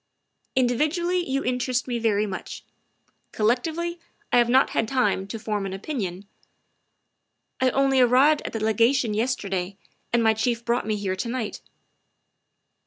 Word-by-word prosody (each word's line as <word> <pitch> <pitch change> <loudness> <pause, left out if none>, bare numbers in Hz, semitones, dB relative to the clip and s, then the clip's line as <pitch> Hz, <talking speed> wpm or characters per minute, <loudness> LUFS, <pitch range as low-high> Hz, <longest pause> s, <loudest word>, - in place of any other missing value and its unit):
" - - -53 0.2
Individually 305 +8 +1
you 275 -5 -1
interest 250 0 -1
me 240 -2 -2
very 215 -2 +1
much; 190 -3 -7 0.7
collec 230 +3 +2
tively 340 +1 -3 0.3
I 245 - +6
have 240 0 +3
not 260 +2 +4
had 225 - 0
time 210 -6 0
to 225 - -5
form 210 -2 -3
an 195 -1 -4
opinion. 195 - -4 1.4
I 260 - +4
only 270 0 +2
arrived 265 +5 +5
at - - -5
the 225 -1 -3
Legation 230 +2 +2
yesterday, 200 -5 -2 0.3
and 235 -1 +2
my 220 0 +4
Chief 235 +1 -1
brought 235 -2 0
me 215 - 0
here 200 -2 -2
to 230 - -3
night." 235 -3 -4
235 Hz, 155 wpm, -24 LUFS, 210-260 Hz, 1.4 s, I